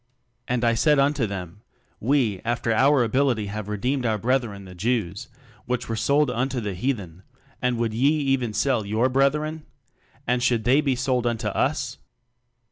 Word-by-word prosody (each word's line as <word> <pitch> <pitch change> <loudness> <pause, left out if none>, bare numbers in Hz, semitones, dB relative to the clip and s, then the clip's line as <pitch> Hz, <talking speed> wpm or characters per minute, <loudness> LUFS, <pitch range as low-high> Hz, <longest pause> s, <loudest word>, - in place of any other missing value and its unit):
"And 125 -1 -1
I 115 -1 +3
said 150 +6 +3
unto 140 -3 +2
them, 95 -1 -7 0.4
We 115 -6 +1
after 120 0 0
our 135 +3 +4
ability 120 -2 +1
have 105 -1 -5
redeemed 125 +6 -1
our 110 -3 +1
breth 125 +5 +1
ren 100 -3 -9
the 90 - -11
Jews, 100 -1 -2 0.4
which 125 0 -2
were 115 - -2
sold 140 +6 +2
unto 125 +1 -1
the 105 -4 -3
heathen; 95 -5 -3 0.4
and 125 -1 +1
would 115 -1 -1
ye 130 +6 +3
even 135 -6 +1
sell 115 +2 +1
your 110 +5 +1
brethren? 150 +4 +1 0.6
and 125 0 +1
should 120 -3 +1
they 130 +6 +4
be 135 -3 +1
sold 125 -1 0
unto 115 -2 -1
us? - - -1
120 Hz, 170 wpm, -24 LUFS, 110-135 Hz, 0.6 s, our